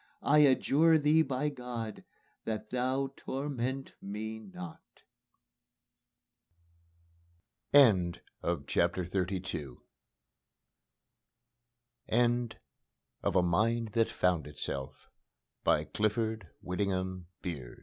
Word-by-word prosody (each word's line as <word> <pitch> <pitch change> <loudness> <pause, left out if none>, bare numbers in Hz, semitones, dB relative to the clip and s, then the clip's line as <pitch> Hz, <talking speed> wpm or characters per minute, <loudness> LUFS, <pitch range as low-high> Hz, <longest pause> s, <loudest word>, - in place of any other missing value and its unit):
I 150 +2 +5
adjure 150 +3 +5
Thee 155 +1 +4
by 140 0 0
God, 125 -5 -6 0.4
that 110 -1 -4
Thou 130 +2 0
torment 135 -1 -3
me 110 +2 -5
not." 90 -5 -11 2.7
End 95 - +6 0.2
of 85 -5 -1
the - - +3
Project - - -14 0.2
Gutenberg 90 -7 -3 2.3
EBook 120 0 +2 0.7
of - - 0
A 90 - +5
Mind 110 +6 +2
That 115 +1 +2
Found 90 -5 +1
Itself 70 -2 -6 0.6
by - - +3
Clifford 110 -1 -1
Whittingham 95 -1 -2 0.2
B 85 -7 -3
110 Hz, 90 wpm, -31 LUFS, 90-130 Hz, 2.7 s, End